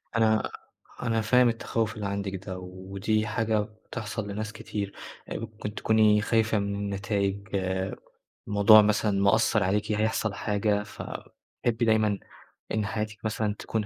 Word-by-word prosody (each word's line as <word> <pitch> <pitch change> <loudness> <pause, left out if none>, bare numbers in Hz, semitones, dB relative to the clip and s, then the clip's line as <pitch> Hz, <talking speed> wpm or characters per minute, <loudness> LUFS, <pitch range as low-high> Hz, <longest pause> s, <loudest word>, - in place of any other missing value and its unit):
أنا 110 -1 +3 0.5
أنا 115 -2 +1
فاهم 125 +3 +5
التخوُّف 115 -1 -1
اللي 105 - -4
عندِك 100 -1 -4
ده 95 -2 -5
ودي 95 +4 -2
حاجة 110 0 +1
بتحصل 110 0 -5
لناس 110 +2 -4
كتير، 100 -2 -5 0.4
آآ - - -3
ممكن 110 -1 -6
تكوني 110 -1 +4
خايفة 110 0 +2
مِن 100 0 -2
النتايج، 100 0 -1 1.1
موضوع 105 +1 +8
مثلًا 105 -1 +2
مأثّر 105 +1 +3
عليكِ، 105 +3 0
هيحصل 110 0 0
حاجة، 105 0 0
فبتحبّي 115 +2 -4
دايمًا 110 -3 +3 0.5
إن 110 -1 0
حياتِك 110 0 -3
مثلًا 110 -1 -1
تكون 110 -2 -2
105 Hz, 130 wpm, -27 LUFS, 100-110 Hz, 1.1 s, موضوع